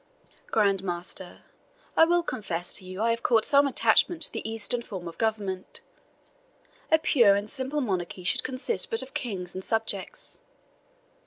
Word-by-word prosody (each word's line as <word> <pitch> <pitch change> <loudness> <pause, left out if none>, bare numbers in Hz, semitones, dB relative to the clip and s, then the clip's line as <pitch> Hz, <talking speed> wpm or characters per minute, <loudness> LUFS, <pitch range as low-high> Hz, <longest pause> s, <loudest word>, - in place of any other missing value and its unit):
Grand 200 -3 +2
Master, 175 0 -6 0.5
I 325 - +7
will 345 +1 +2
confess 175 - -3
to 195 - -2
you 185 +3 -4
I 230 - +3
have 230 0 -2
caught 230 -3 +3
some 280 0 +4
attachment 325 +4 +3
to - - +4
the - - -5
Eastern 225 +2 -1
form 190 -7 -7
of 165 - -9
government 205 -4 -2 1.1
a 320 - +7
pure 235 -10 +4
and 205 +1 -2
simple 265 +5 -1
monarchy 185 -5 -3
should 180 - +1
consist 260 - -1
but 455 - +2
of 265 +1 -12
king 195 -8 -4
and 185 - -6
subjects. 220 -3 -3
220 Hz, 160 wpm, -27 LUFS, 190-260 Hz, 1.1 s, I